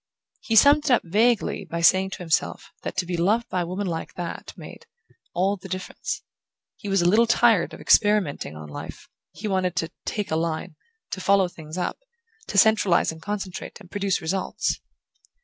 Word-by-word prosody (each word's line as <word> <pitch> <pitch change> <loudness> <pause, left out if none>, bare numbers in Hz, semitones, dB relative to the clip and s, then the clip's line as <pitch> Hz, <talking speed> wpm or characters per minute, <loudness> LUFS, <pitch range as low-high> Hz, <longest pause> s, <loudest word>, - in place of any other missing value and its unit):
He 225 - -2
summed 290 +6 +6
it - - +1
up 245 - +4
vaguely 220 +5 +2
by 170 0 -4
saying 190 +3 +5
to - - -6
himself 165 -2 -1
that - - -6
to 190 - +1
be 175 0 -3
loved 210 +7 +2
by 180 - -1
a 170 - -3
woman 190 +3 -3
like 165 -3 -4
that 175 -1 -6
made - - -11 0.5
"all 195 +3 +1
the 190 +1 -11
difference"...He 185 +3 -7
was 195 -2 +2
a - - +3
little 225 +6 +5
tired 230 -5 +4
of - - -10
experimenting 205 - +2
on 75 0 -9
life; 75 - -9 0.2
he 215 - -6
wanted 185 -3 0
to 165 -1 -2
"take 210 -5 -3
a - - +2
line", 160 -1 -2 0.4
to 185 - -4
follow 195 -1 +4
things 160 -1 -10
up, 180 - -2 0.5
to - - -3
centralize 205 -5 +4
and 160 0 -11
concentrate, 195 0 -5
and 185 -4 -16
produce 200 -2 0
results. 185 +4 -2
190 Hz, 185 wpm, -24 LUFS, 170-205 Hz, 0.5 s, summed